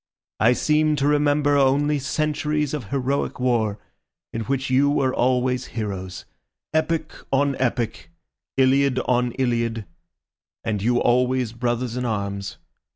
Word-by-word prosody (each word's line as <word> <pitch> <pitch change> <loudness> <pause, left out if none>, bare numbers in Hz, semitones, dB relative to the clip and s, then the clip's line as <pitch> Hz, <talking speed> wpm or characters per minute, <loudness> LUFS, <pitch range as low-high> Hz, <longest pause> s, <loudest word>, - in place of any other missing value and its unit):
I 115 +3 +5
seem 150 +3 +2
to 140 -1 0
remember 145 0 +3
only 145 +2 +3
centuries 150 +1 -1
of 145 -7 -3
heroic 135 +5 -2
war, 115 -5 +1 0.6
in 115 - -2
which 135 0 -2
you 140 +2 +4
were 135 -3 +1
always 125 0 +1
heroes—epic 105 - -4 0.2
on 140 +1 +2
epic, 120 0 -2 0.5
iliad 135 0 +3
on 125 -1 +2
iliad, 115 -4 -1 0.8
and 105 -3 -2
you 120 +3 +2
always 125 -1 +2
brothers 120 0 -2
in 125 - -2
arms. 100 -3 -3
130 Hz, 120 wpm, -23 LUFS, 120-140 Hz, 0.8 s, I